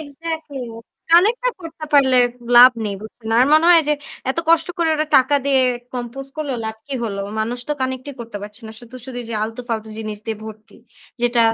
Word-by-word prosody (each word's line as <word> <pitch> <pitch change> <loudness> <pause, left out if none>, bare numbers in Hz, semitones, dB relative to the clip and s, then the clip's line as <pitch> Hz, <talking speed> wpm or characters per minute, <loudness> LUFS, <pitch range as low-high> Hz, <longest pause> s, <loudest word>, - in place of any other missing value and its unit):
Excatly, 310 0 -6 0.5
Connect 400 +8 +5
না - - +3
করতে 325 -2 -8
পারলে 265 -3 +5 0.4
লাভ 250 +1 +10
নেই 205 -2 -2
বুঝছেন। 220 +1 -9
আর 250 - +6
মনে 310 +2 +5
হয় 335 -2 +7
যে - - +4 0.4
এত 300 - -4
কষ্ট 330 0 +4
করে 335 -1 +2
ওরা 310 0 0
টাকা 260 +2 +4
দিয়ে 270 -2 +3 0.3
compose 250 +3 -6
করলো, 300 -3 -3
লাভ 220 0 -4
কি 280 - -5
হল? 200 -3 -3 0.2
মানুষ 230 +3 -2
তো - - +1
connect 260 0 -2
ই - - -8
করতে 230 -2 -7
পারছে 210 +3 -10
না। - - -8
শুধু, 240 +1 -14
শুধু 250 -2 -6
যে - - -5
আলতু-ফালতু 225 -1 -4
জিনিস 215 -1 -5
দিয়ে 220 -1 -2
ভর্তি। 220 0 -11 0.5
যেটা 240 0 +2
255 Hz, 200 wpm, -20 LUFS, 225-310 Hz, 0.5 s, লাভ